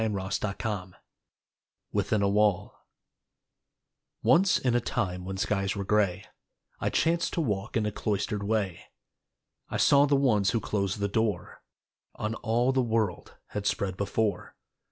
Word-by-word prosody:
DAY 110 - +1
DREAMS 100 -1 -3 1.0
WITHIN 105 -2 +1
A - - +3
WALL 105 -2 +2 1.5
Once 185 +3 +5
in 125 -2 0
a 120 - +2
time 95 -7 -2
when 95 0 -4
skies 100 0 0
were 100 - -3
gray 100 -1 +1 0.5
I - - 0
chanced 170 +1 +1
to - - -1
walk 105 -5 -2
in 110 - 0
a 105 - -1
cloistered 105 0 -2
way, 100 -4 -1 0.8
I - - -2
saw 140 +1 +5
the 140 - +3
ones 110 -8 +3
who 115 - +1
closed 100 -1 -1
the 100 - +1
door 105 -2 -2 0.5
On 105 +1 -3
all 120 +2 +1
the 130 0 +2
world 110 -6 -1
had 105 -1 -3
spread 95 -3 -1
before. 100 0 -2
105 Hz, 145 wpm, -28 LUFS, 100-115 Hz, 1.5 s, Once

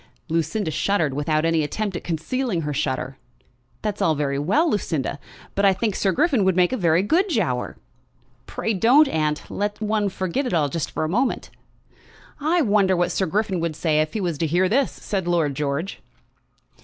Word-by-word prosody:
Lucinda 165 +3 -1
shuddered, 160 -4 0
without 155 +2 0
any 165 -1 +2
attempt 200 +5 -3
at - - -5
concealing 180 +5 -2
her 150 -1 -3
shudder. 130 -1 -2 0.7
"That's 210 -1 -2
all 165 -5 +3
very 140 -1 -1
well, 205 - +2
Lucinda, 160 - -1 0.3
but 200 - -1
I 195 -1 +6
think 210 +2 -1
Sir 195 - +1
Griffin 275 - +2
would 190 -1 +2
make 180 +5 +3
a - - +2
very 170 -4 +2
good 345 - +2
Giaour." 165 - -1 0.7
"Pray 225 - -2
don't, 250 +10 +5
aunt. 155 - -1
Let 205 0 -2
one 215 -1 0
forget 190 +9 -2
it 210 - -1
all 150 -3 +2
just 165 +3 -3
for - - -3
a - - 0
moment." 240 +11 -1 0.9
"I 320 +3 +2
wonder 200 -4 +3
what 175 0 +1
Sir 190 - 0
Griffin 195 +1 0
would 165 -2 -2
say 155 -1 +1
if 155 0 -2
he 215 - -2
was 170 -6 -2
to 165 - +1
hear 175 +4 +2
this!" 265 +7 +2
said 190 -4 -4
Lord 165 -5 +1
George. 145 +6 -3
180 Hz, 190 wpm, -23 LUFS, 155-210 Hz, 0.9 s, I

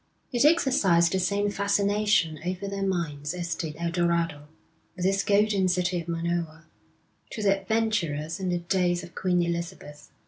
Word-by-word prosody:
It 245 +2 +2
exercised 200 - +4
the 190 - +1
same 200 +2 0
fascination 200 -5 +1
over 185 +2 -3
their 200 0 -4
minds 165 -5 -2
as 175 -1 -3
did 155 -3 -5
El 170 0 -2
Dorado, 170 -4 0 0.5
with 180 0 -3
its 195 +1 +2
golden 205 -2 +2
city 180 -1 0
of 165 - -12
Monoa, 165 -1 -3 0.7
to 215 - -5
the 195 -1 +2
adventurers 190 -8 -1
in 185 -1 -2
the 175 - +1
days 175 0 0
of 170 - -11
Queen 180 -2 +1
Elizabeth. 170 -3 -5
180 Hz, 160 wpm, -26 LUFS, 170-200 Hz, 0.7 s, exercised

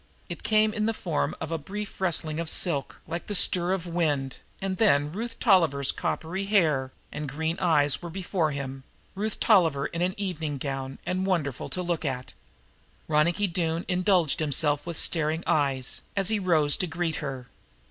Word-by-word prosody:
It - - -6
came 215 0 +3
in 215 -1 0
the 225 - 0
form 170 -7 -1
of 160 - -5
a 165 - -1
brief 205 +6 -7
rustling 160 -3 +1
of 170 -1 0
silk, 150 -6 +1
like 170 +1 -5
the 205 - -2
stir 180 -1 +4
of 190 -2 -1
wind, 150 -6 -1 0.2
and 190 -1 -2
then 150 -9 +3
Ruth 230 +5 -5
Tolliver's 165 - +3
coppery 185 +5 -3
hair 155 -10 +2 0.2
and 150 -2 -4
green 160 +4 -2
blue - - -2
eyes 145 -2 +3
were 175 - -6
before 180 -2 -1
him 135 -2 -5 0.3
Ruth 210 +2 -3
Tolliver 165 -10 +4
in 170 - -3
an 185 +2 0
evening 160 -7 -3
gown 135 -1 -4
and 185 +1 -1
wonderful 150 -9 -1
to 180 - -3
look 175 -2 -1
at. 130 -3 -4 0.7
Ronicky 165 +6 +2
Doone 170 -2 -1
indulged 180 -4 +2
himself 150 0 +1
with 170 -3 -3
staring 160 0 +1
eyes, 135 -4 0 0.2
as 195 0 +2
he 220 -1 +1
rose 160 -6 +3
to 185 - -1
greet 165 -1 -2
her. 135 -4 -5
165 Hz, 180 wpm, -27 LUFS, 145-185 Hz, 0.7 s, stir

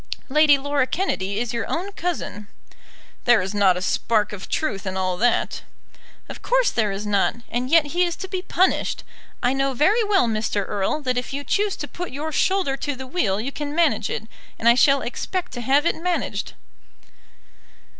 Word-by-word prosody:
Lady 300 0 +5
Laura 280 -1 0
Kennedy 200 - -1
is 240 0 -2
your 230 - -2
own 370 +5 -2
cousin." 330 - -4 0.8
"There 240 -2 +6
is 190 +2 -3
not 195 -3 +4
a 180 - -4
spark 210 +1 +1
of 195 -2 -8
truth 210 -11 -2
in 190 0 -3
all 185 -1 0
that." 240 +3 +1 0.7
"Of - - -9
course - - +2
there 215 -3 +1
is 195 +2 -5
not; 205 -2 +1
and 245 +2 -2
yet 325 0 +5
he 355 +1 +3
is 345 -1 -1
to 380 - -7
be 370 -1 -3
punished. 370 0 +1 0.4
I 245 +1 +3
know 270 0 0
very 405 - +3
well, 400 - +3
Mr. 215 -3 -1
Erle, 210 +9 -1
that 250 -2 0
if 250 - -7
you 285 +1 -3
choose 410 +5 0
to - - -6
put 355 0 -6
your 300 +4 -4
shoulder 375 -4 +1
to 285 +1 -3
the 265 +1 -7
wheel 255 - 0
you 250 +6 -3
can 290 +1 -5
manage 320 -10 +2
it; - - -3 0.3
and 230 - -1
I 235 - +8
shall 275 +2 +4
expect 365 +9 -4
to 245 - -6
have 275 +6 +2
it - - +3
managed." 350 +1 -2
270 Hz, 195 wpm, -23 LUFS, 215-335 Hz, 0.8 s, I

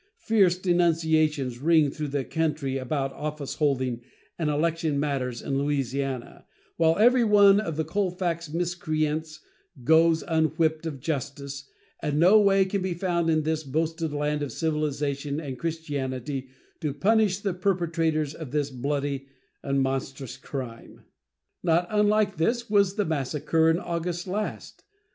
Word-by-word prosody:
Fierce 195 -6 +3
denunciations 160 -7 +1
ring 155 -1 +4
through 150 0 -4
the 140 -1 -2
country 150 -4 -1
about 135 +1 -2
office 150 -2 -5
holding 130 -5 0 0.4
and 160 -2 0
election 155 -1 0
matters 130 -4 -2
in 135 -1 -1
Louisiana, 135 -2 -2 0.3
while 165 0 +3
every 240 +3 +5
one 205 -2 +6
of 165 -8 -3
the 160 - +1
Colfax 175 -2 -2
miscreants 155 -2 -2 0.4
goes 160 +3 +4
unwhipped 160 0 +1
of 145 -4 -5
justice, 140 -1 -4 0.3
and 150 -1 -1
no 185 +6 +7
way 195 -2 +4
can 195 +1 -2
be 185 -2 -2
found 170 -2 0
in 155 -1 +2
this 160 0 -1
boasted 160 +3 -2
land 150 0 -1
of 145 - -3
civilization 150 -2 -2
and 135 -5 -6
Christianity 140 -5 -3 0.3
to 150 -3 -3
punish 210 +2 +3
the 200 -2 -2
perpetrators 165 -5 0
of 160 -4 -8
this 145 +1 -1
bloody 140 +1 -2 0.3
and 140 -1 0
monstrous 135 -1 -3
crime. 125 -5 -8 0.6
Not 170 0 +2
unlike 210 -1 +2
this 235 +9 0
was 200 -2 +3
the 205 -2 0
massacre 160 +2 +1
in 165 - +3
August 175 0 -3
last. 205 +3 -5
155 Hz, 140 wpm, -26 LUFS, 140-175 Hz, 0.6 s, no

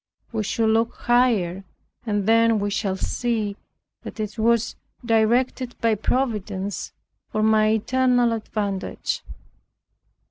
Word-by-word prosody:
We 225 -2 -1
should 220 +2 0
look 225 +1 +1
higher 220 -7 +2 0.4
and 205 -2 0
then 230 0 +4
we 205 0 -1
shall 195 -2 -1
see 220 -2 -1 0.5
that - - -9
it 215 +1 -4
was 235 +1 +2 0.3
directed 240 +2 +1
by 230 -1 +2
Providence 210 -4 -2 0.4
for 215 -1 -1
my 215 0 +4
eternal 245 +1 +2
advantage. 205 -3 -3
220 Hz, 110 wpm, -23 LUFS, 205-235 Hz, 0.5 s, then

